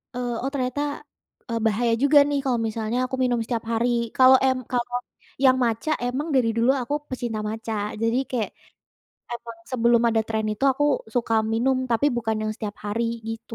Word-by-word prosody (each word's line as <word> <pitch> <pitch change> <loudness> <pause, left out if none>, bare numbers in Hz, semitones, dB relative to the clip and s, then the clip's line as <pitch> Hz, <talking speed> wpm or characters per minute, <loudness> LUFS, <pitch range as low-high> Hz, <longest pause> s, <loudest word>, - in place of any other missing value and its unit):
eee, 245 -1 -2
oh 270 - 0
ternyata, 255 +1 -1 0.7
eee, 230 -1 -1
bahaya 230 +2 +2
juga 290 +1 +5
nih 285 -1 +1
kalau 245 -3 +1
misalnya 220 +1 -2
aku 260 +1 -3
minum 245 -2 +1
setiap 230 -2 -2
hari. 230 +2 +1 0.3
Kalau 260 0 +8
em 260 -1 +3
kalau 245 0 -1 0.5
yang 255 -1 +6
matcha 230 +6 0
emang 260 +5 -2
dari 245 -3 +3
dulu 230 +2 +3
aku 250 +4 -3 0.2
pecinta 240 -4 -3
matcha, 225 +1 -4 0.3
jadi 230 +2 +2
kayak 230 -4 -1 0.8
emang 235 -1 -7
sebelum 235 -1 +3
ada 225 -1 +2
tren 220 -1 -1
itu 215 - -3
aku 290 +3 0 0.3
suka 230 -2 +1 0.2
minum 255 +4 +2
tapi 235 +5 +2
bukan 225 -2 -1
yang 215 - -1
setiap 210 -2 -6
hari 215 +3 -1 0.2
gitu. 225 0 -6
235 Hz, 175 wpm, -24 LUFS, 225-255 Hz, 0.8 s, Kalau